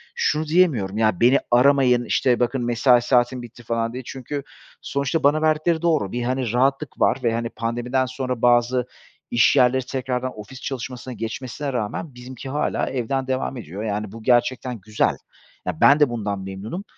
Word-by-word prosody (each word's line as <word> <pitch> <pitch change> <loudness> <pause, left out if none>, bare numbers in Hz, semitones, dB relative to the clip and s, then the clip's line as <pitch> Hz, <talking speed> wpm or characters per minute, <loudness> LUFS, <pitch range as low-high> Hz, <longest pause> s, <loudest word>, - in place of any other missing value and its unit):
şunu 155 +1 0
diyemiyorum 145 - +2
"Ya 110 -5 +2
beni 125 +4 +5
aramayın, 125 -1 +4
işte, 125 +2 +2
bakın 120 0 0
mesai 120 +1 +4
saatim 120 0 +2
bitti." 120 0 -12
falan 115 0 -2
diye. 130 - -6
Çünkü 135 +2 -6 0.4
sonuçta 140 +3 -1
bana 150 +2 +4
verdikleri 155 +1 +1
doğru 155 - +1
bir, 120 0 -2
hani, 125 -2 -1
rahatlık 135 +3 0
var 130 - +4
ve 115 - +2
hani 115 0 -2
pandemiden 120 +3 -1
sonra 130 -1 -4
bazı 120 +1 +3 0.5
iş 120 +3 +4
yerleri 130 -1 +3
tekrardan 130 -2 -3
ofis 130 +6 -10
çalışmasına 130 -1 -5
geçmesine 125 +4 -5
rağmen 125 +5 -4
bizimki 125 +1 -9
hâlâ 145 +2 -1
evden 130 +1 -2
devam 130 0 -2
ediyor, 100 -2 -7
yani, 105 -1 -3
bu 115 -1 -10
gerçekten 125 0 +1
güzel. 105 +2 0 0.5
Ya, 90 -3 -4
ben 145 +2 +7
de 150 - +4
bundan 105 -4 -3
memnunum. 95 - -6
125 Hz, 165 wpm, -22 LUFS, 115-135 Hz, 0.5 s, ben